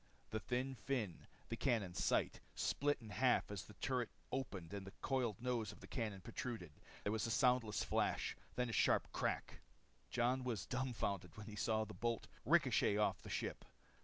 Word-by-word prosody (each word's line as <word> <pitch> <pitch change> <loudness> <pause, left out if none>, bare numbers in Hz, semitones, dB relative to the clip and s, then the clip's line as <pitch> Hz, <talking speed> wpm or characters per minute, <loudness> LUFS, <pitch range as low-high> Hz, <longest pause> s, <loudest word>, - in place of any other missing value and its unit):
The 110 - 0
thin 125 +4 -1
fin 120 -8 -2 0.2
the 115 - -1
cannon's 110 -9 +1
sight - - +2 0.2
split 145 +1 +2
in 110 -2 -9
half 125 -1 +3
as 100 -2 -2
the 105 - -13
turret 125 +5 0 0.2
opened 100 -10 -3
and 100 -1 -4
the 95 - -8
coiled 125 -6 +1
nose 120 -4 0
of - - -13
the - - -10
cannon 110 -6 -2
protruded. 115 - -4 0.3
There 105 - +1
was 110 +1 +1
a - - -2
soundless 120 -3 +3
flash. - - +1 0.2
Then 125 0 +1
a - - -4
sharp - - +4
crack. - - -1 0.5
Jon 125 +5 +2
was 115 -8 -1
dumbfounded 110 -8 -1
when 105 - -6
he 105 -1 -7
saw 110 0 +2
the 105 - -8
bolt 115 +4 -1 0.2
ricochet 130 -9 +5
off 105 - +2
the - - -9
ship. - - -2
115 Hz, 180 wpm, -40 LUFS, 105-125 Hz, 0.5 s, ricochet